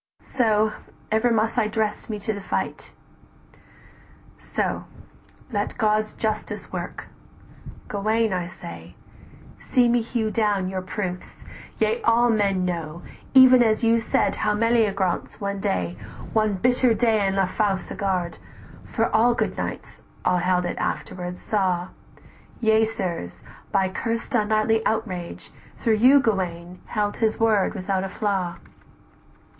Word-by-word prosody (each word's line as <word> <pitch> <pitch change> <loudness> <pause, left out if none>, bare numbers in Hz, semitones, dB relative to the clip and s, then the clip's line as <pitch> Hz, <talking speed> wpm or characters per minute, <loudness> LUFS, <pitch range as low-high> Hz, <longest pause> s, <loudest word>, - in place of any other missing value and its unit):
So, 215 -4 +1 0.4
ever 220 +3 +3
must 225 +1 +1
I 215 - +2
dress 215 0 -2
me 215 - -2
to 215 +2 -2
the 200 - -6
fight, - - -3 1.5
"So: - - -2 0.7
let 205 -2 -2
God's 215 -2 +1
justice 215 -1 -4
work! - - -6 0.8
Gauwaine, 215 +1 0
I 180 -2 -2
say, 85 - -10 0.6
See 250 -2 +2
me 240 0 +3
hew 225 -1 -2
down 210 -4 +1
your 190 0 -3
proofs: 185 -1 -6 0.3
yea 465 +1 +1
all 240 - +4
men 200 -4 +1
know 170 -1 -4 0.3
Even 255 -1 +9
as 220 -1 +2
you 230 0 +4
said 225 - 0
how 210 -1 +1
Mellyagraunce 210 -5 +1
one 200 -1 -3
day, 90 - -1 0.4
"One 215 -2 +2
bitter 245 +3 +3
day 220 -2 +2
in 195 - 0
la 195 -1 +3
Fausse 195 0 -1
Garde, 185 -3 -2 0.4
for 225 - -1
so - - -3
All 235 +2 +4
good - - -1
knights - - -6 0.2
held 180 0 +2
it 175 - -3
after, 180 -1 -3
saw: 185 -2 -1 0.7
Yea, 220 -1 +4
sirs, 185 - -4 0.3
by 190 - +2
cursed 230 +6 -3
unknightly 220 0 +2
outrage; 190 -6 -3 0.3
though 230 - +4
"You, 250 +6 +6
Gauwaine, 180 -7 -2
held 205 -1 -1
his 220 -1 0
word 220 -3 +2
without 190 0 -1
a 195 - -3
flaw. 190 -4 -2
210 Hz, 135 wpm, -24 LUFS, 185-225 Hz, 1.5 s, Even